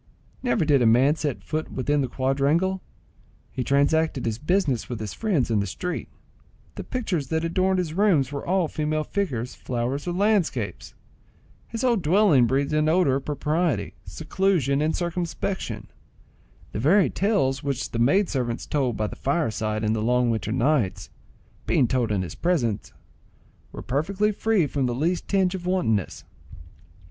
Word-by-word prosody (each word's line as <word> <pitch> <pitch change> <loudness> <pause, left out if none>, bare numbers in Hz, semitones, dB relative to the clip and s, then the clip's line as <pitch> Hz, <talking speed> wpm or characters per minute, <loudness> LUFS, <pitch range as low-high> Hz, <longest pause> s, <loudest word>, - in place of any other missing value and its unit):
Never 245 -10 +1
did 145 -3 +4
a 120 - +4
man 125 +6 +5
set 145 -4 -3
foot 155 0 -3
within 145 +2 0
the 130 - 0
quadrangle; 140 +9 +1 0.7
he 130 - -3
transacted 145 +2 +1
his 115 0 -2
business 155 - 0
with 120 -3 -4
his 110 -2 -5
friends 175 - 0
in 110 - +2
the 100 - -1
street; 180 - -4 0.7
the - - -6
pictures 185 - -2
that 160 0 -1
adorned 185 +3 +1
his 175 -4 -2
rooms 170 -9 +2
were 140 - -4
all 185 -1 +1
female 155 0 -1
figures, 135 - -2
flowers, 130 +5 -3
or 175 - -1
landscapes; 200 -1 0 0.7
his 230 +1 -5
whole 245 -2 +3
dwelling 165 - +4
breathed 140 +4 0
an 155 0 +2
odour 160 -6 +3
of 135 - -8
propriety, 150 +3 -1
seclusion, 160 -4 0
and 155 +1 +1
circumspection; 170 - -3 0.9
the - - -4
very 175 - +4
tales 140 -11 +1
which 140 -2 -3
the 115 - -3
maid 180 - +3
servants 125 -4 -2
told 130 -6 -1
by 110 - 0
the - - -5
fireside 110 -7 -1
in 110 0 +1
the 110 - -1
long 125 +1 +2
winter 110 -1 -2
nights, 125 -4 0 0.6
being 125 - +3
told 120 -2 0
in 100 -3 0
his 90 - -6
presence, 120 - -1 0.8
were - - -8
perfectly 190 +10 0
free 215 -4 +1
from 140 -2 -1
the 120 - -2
least 170 +7 -1
tinge 190 -2 +2
of 180 -2 -5
wantonness. 110 - 0
150 Hz, 160 wpm, -25 LUFS, 125-180 Hz, 0.9 s, man